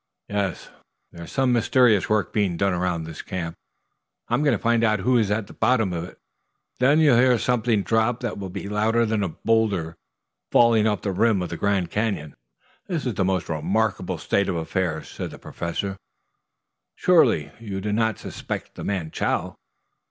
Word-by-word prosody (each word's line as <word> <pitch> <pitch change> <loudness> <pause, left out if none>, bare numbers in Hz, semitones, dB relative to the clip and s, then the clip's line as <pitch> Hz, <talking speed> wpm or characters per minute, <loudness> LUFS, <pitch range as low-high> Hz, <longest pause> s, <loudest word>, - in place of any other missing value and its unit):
"Yes. 100 -3 -2 0.4
There's 85 0 -10
some 130 -2 +2
mysterious 120 -3 +3
work 105 -1 +1
being 100 -5 +1
done 100 +1 +1
around 90 -2 -1
this 80 -1 -7
camp. 85 -3 -4 0.8
I'm - - +1
going 140 -7 +3
to - - -19
find 115 0 +2
out 110 -3 +2
who 125 +5 +2
is 105 -3 +1
at 105 0 0
the - - -13
bottom 110 -5 +1
of 85 -1 -3
it; 90 - -13 0.6
then 135 +4 +4
you'll 145 -6 +5
hear 125 -1 +5
something 115 -3 +1
drop 115 +3 +1
that 120 -4 -3
will 95 -1 -5
be 90 - -6
louder 110 +3 +1
than 110 -1 0
a 95 - -1
boulder 100 -4 0 0.6
falling 115 -2 +5
off 105 -4 -1
the 100 - -1
rim 100 0 +2
of 90 - -5
the - - -4
Grand 95 -3 0
Canyon." 105 -10 -2 0.5
"This 170 -7 -2
is 120 -6 -3
a - - +4
most 95 -2 0
remarkable 95 +5 -1
state 100 0 0
of 90 - -1
affairs." 80 -1 -2
said - - -6
the - - -10
Professor. 95 +3 -4 1.0
"Surely - - +3
you 100 -4 -5
do 105 +2 -2
not 110 -1 +1
suspect - - -6
the - - -8
man 90 -6 -2
Chow?" - - -1
105 Hz, 180 wpm, -24 LUFS, 90-115 Hz, 1.0 s, you'll